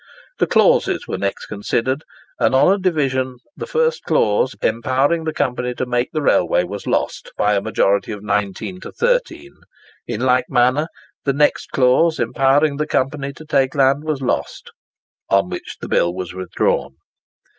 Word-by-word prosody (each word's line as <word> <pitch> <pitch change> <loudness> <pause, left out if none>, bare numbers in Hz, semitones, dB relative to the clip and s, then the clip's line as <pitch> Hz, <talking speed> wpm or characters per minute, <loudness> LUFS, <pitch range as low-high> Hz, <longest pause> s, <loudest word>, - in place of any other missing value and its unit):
The - - +2
clauses - - +2
were - - -3
next 100 0 -3
considered, 120 +7 -2 0.4
and - - +2
on 160 +8 +5
a 200 - -1
division 135 -8 0 0.2
the - - -6
first 480 0 +1
clause, 480 - +1
empowering 135 +7 +1
the 160 - -1
Company 125 -4 -2
to 130 - -2
make 125 0 -1
the 155 -2 -2
railway, 90 -7 +3
was 100 +3 -7
lost - - -2
by 105 - +2
a 100 - +1
majority 100 -1 +1
of 105 -1 -7
19 105 - -2
to - - -8
13. 470 -9 -1 0.5
In - - -3
like 125 -1 +2
manner, 130 +4 +2 0.4
the 140 - +1
next 145 +1 +1
clause, 135 +6 +3
empowering 135 +5 +2
the 150 0 -1
Company 140 +1 -1
to 155 - -13
take 135 -2 +1
land, 140 +1 +3
was 150 -3 -3
lost; - - -3 0.6
on 100 0 +2
which - - -7
the - - -6
bill 85 - +2
was 90 -1 -5
withdrawn. 90 -6 -1
130 Hz, 165 wpm, -19 LUFS, 115-155 Hz, 0.6 s, on